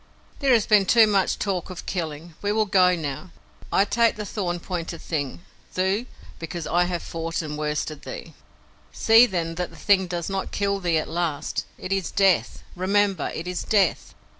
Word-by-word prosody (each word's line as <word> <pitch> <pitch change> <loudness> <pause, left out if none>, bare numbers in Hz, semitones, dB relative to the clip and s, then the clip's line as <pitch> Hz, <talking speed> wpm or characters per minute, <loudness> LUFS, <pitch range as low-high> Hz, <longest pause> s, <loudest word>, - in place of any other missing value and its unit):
"There 275 -3 +3
has 225 -3 +4
been 205 -3 +4
too 230 -2 +7
much 200 -3 +1
talk 190 -3 -2
of 185 -1 -8
killing. 165 -2 -4
We 205 - 0
will 215 0 +2
go 185 -2 +4
now. 155 +2 -5 0.4
I 195 - +4
take 230 +2 +2
the 210 - -5
thorn 180 -4 -3
pointed 170 -2 -5
thing, 145 -1 -4 0.3
Thuu, 190 +6 0 0.3
because 165 0 -5
I 175 +3 +2
have 175 -1 -3
fought 165 0 -3
and 150 -1 -5
worsted 150 0 -3
thee." - - -8 0.6
"See, 225 +2 +6
then, 170 -4 -2
that 180 - -3
the - - -16
thing 190 -2 +3
does 175 -1 -3
not 195 -1 -3
kill 200 -1 0
thee 175 -3 +1
at 155 - -1
last. 165 -3 -2
It 185 - -3
is 195 -2 -1
Death! 195 -3 +2
Remember, 195 -1 +1
it 165 - -5
is 180 0 -3
Death! 200 -5 +1
180 Hz, 185 wpm, -24 LUFS, 165-200 Hz, 0.6 s, too